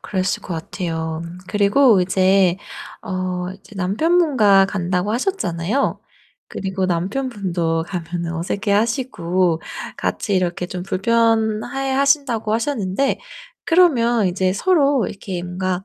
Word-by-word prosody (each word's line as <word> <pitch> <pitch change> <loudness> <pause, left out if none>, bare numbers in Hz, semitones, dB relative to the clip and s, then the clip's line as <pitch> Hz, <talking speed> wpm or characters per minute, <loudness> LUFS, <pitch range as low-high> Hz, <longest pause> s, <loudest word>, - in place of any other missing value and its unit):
그랬을 190 0 -2
것 180 - -5
같아요. 160 -1 -4 0.2
그리고 205 +2 +4
이제 185 0 +3 0.5
어 185 -3 -3
이제 200 +2 -16
남편분과 210 - +3
간다고 185 +1 -1
하셨잖아요. 235 - -1 0.5
그리고 190 -1 -2
남편분도 180 -4 -1
가면은 170 -2 -4
어색해하시고 190 - 0 0.4
같이 205 - -2
이렇게 180 -1 0
좀 180 0 -6
불편해하신다고 230 +5 +1
하셨는데 230 0 0 0.4
그러면 240 - +3
인제 185 +1 0
서로 280 - +2
이렇게 190 -3 -6
뭔가 185 +1 -3
195 Hz, 275 characters per minute, -20 LUFS, 180-235 Hz, 0.5 s, 그리고